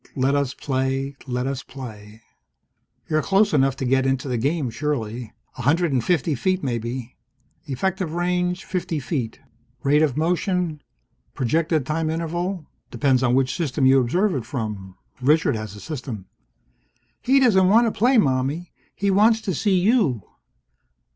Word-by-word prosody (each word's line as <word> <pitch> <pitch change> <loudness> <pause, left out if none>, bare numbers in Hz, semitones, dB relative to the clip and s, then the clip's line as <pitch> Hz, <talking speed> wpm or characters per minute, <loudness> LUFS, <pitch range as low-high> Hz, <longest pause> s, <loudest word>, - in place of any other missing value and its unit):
Let 135 +1 +1
us 140 -2 0
play. 135 0 -2
Let 125 0 -2
us 135 0 -2
play. 110 -6 -10 0.8
You're 155 0 +1
close 200 +4 +2
enough 135 -2 +3
to 135 - -4
get 130 +1 +2
into 135 +1 -1
the 125 - -1
game, 140 0 0
surely. 120 -5 -3 0.3
A - - -2
hundred 160 +4 +2
and 125 -3 +1
fifty 165 -2 +1
feet, 185 +8 0
maybe. 120 0 -4 0.5
Effective 175 +4 -2
range, 180 +1 -1
fifty 175 -4 -2
feet. 130 -5 -4 0.4
Rate 145 +2 +4
of 150 -4 +1
motion? 175 -1 0 0.5
Projected 155 +3 +1
time 155 +1 -1
interval? 170 +2 -3 0.2
Depends 135 -3 +2
on 125 -1 +2
which 130 -1 +1
system 145 -5 0
you 135 0 +6
observe 180 - +1
it 130 - -2
from. 105 -6 -5 0.3
Richard 150 +1 +3
has 110 -2 -6
a - - -10
system. 125 - -6 1.0
"He 270 +2 +4
doesn't 190 -8 +4
want 230 +4 +5
to 225 - +1
play, 245 +5 +3
Mommie. 140 - 0 0.2
He 200 0 0
wants 220 +3 +4
to 195 -4 -2
see 190 +3 +2
you!" 180 - +2
145 Hz, 155 wpm, -23 LUFS, 130-180 Hz, 1.0 s, you